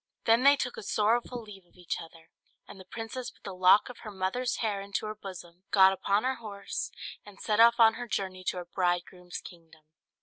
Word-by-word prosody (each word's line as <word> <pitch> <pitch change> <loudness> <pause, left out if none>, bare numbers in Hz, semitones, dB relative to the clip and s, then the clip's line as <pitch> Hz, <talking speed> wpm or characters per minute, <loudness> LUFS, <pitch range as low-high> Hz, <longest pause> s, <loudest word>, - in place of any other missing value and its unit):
Then 230 +2 +5
they 280 +2 +7
took 250 -3 -4
a - - -5
sorrowful 230 +4 0
leave 200 -3 -12
of 175 - -30
each 180 -1 -4
other, 165 0 -14 0.4
and 195 - -12
the 190 - -12
princess 235 +5 -6
put - - -24
the 195 - -6
lock 185 +2 +5
of 250 - -10
her 215 - -8
mother's 205 +6 -2
hair 210 -3 -2
into 200 +1 -3
her 215 - -4
bosom, 185 -3 -11
got 190 -1 +6
upon 200 +2 0
her 260 +1 0
horse, 205 -3 -5 0.3
and 205 -1 -15
set 215 0 0
off 235 +1 +6
on 225 -1 +7
her 245 +1 -6
journey 190 -3 -3
to 185 - -1
her 175 - -5
bridegroom's 175 0 -2
kingdom. 165 -3 -15
200 Hz, 210 wpm, -29 LUFS, 185-230 Hz, 0.4 s, they